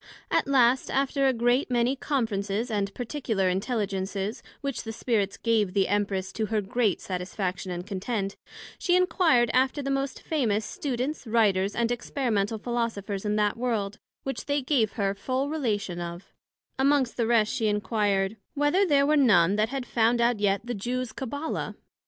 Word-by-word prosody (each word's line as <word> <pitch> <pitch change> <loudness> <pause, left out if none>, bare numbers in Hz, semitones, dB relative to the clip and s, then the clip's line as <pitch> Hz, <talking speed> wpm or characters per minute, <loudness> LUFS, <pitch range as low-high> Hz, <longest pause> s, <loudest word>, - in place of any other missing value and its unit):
At - - +2
last, 255 -2 +3
after 275 0 +1
a - - +5
great 245 +3 +1
many 245 +1 +2
conferences 225 -5 -1
and 200 -2 0
particular 235 -6 -1
intelligences, 195 0 -2 0.2
which 275 -4 -3
the 225 - -6
Spirits 215 -3 -1
gave 215 -5 +1
the 195 -1 +3
Empress, 195 -1 -1
to 220 -1 -1
her 215 0 0
great 210 0 0
satisfaction 185 0 -3
and 175 0 -4
content; 195 0 -3 0.4
she 355 - +2
enquired 330 -10 +3
after 265 +3 +2
the 275 - -1
most 275 0 -2
famous 225 -9 0
Students, 265 0 -3
Writers, 205 -3 +2
and 235 0 +1
Experimental 230 -4 -1
Philosophers 220 -4 -3
in 210 0 +1
that 210 0 +1
World, 215 -4 -2 0.2
which 270 +1 -4
they 285 -1 0
gave 250 -6 +1
her 200 -4 0
full 260 +7 -2
relation 205 - -1
of: 170 +1 -7 0.5
amongst 270 -2 +3
the 230 -2 0
rest 225 -2 +3
she 235 -4 0
enquired, 205 -1 0 0.2
Whether 295 +7 +3
there 280 -3 +4
were 305 +2 +3
none 200 - +5
that 215 +1 +2
had 270 -1 -3
found 235 0 +2
out 235 -2 +2
yet 200 -1 +2
the 245 - -3
Jews 245 +3 -3
Cabbala? 285 +4 -4
230 Hz, 165 wpm, -27 LUFS, 200-260 Hz, 0.5 s, a